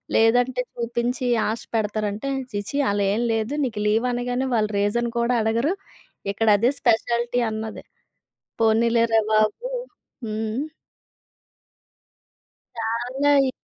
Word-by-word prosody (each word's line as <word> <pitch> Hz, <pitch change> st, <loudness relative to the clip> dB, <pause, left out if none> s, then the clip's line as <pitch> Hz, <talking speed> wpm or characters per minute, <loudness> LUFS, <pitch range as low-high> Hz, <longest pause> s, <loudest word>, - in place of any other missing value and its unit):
లేదంటే 245 Hz, +3 st, +3 dB
చూపించి 240 Hz, +2 st, -2 dB, 0.2 s
ఆశ 220 Hz, +1 st, -2 dB
పెడతారంటే, 215 Hz, +3 st, -1 dB, 0.2 s
"ఛీ 205 Hz, -, -1 dB
ఛీ 280 Hz, -, -3 dB
అలా 200 Hz, -1 st, +1 dB
ఏమి 235 Hz, +3 st, 0 dB
లేదు. 225 Hz, +4 st, -1 dB
నీకు 220 Hz, -4 st, -3 dB
లీవ్ 225 Hz, +4 st, +2 dB
అనగానే 245 Hz, +2 st, -1 dB
వాళ్ళు 215 Hz, -1 st, +1 dB
రీజన్ 235 Hz, +4 st, +1 dB
కూడా 235 Hz, +1 st, +2 dB
అడగరు. 230 Hz, -, +1 dB, 0.6 s
ఇక్కడ 225 Hz, +2 st, -1 dB
అదే 235 Hz, +5 st, +3 dB
స్పెషాలిటీ" 235 Hz, +1 st, +1 dB
అన్నది. 220 Hz, 0 st, -5 dB, 0.8 s
పోనీలేరా! 230 Hz, 0 st, +3 dB
బాబు 215 Hz, -, +2 dB, 0.6 s
హ్మ్. 220 Hz, +6 st, -2 dB, 2.1 s
చాలా 240 Hz, +5 st, 0 dB, 0.2 s
ఇ -, -, 0 dB
230 Hz, 110 wpm, -23 LUFS, 220-245 Hz, 2.1 s, లేదంటే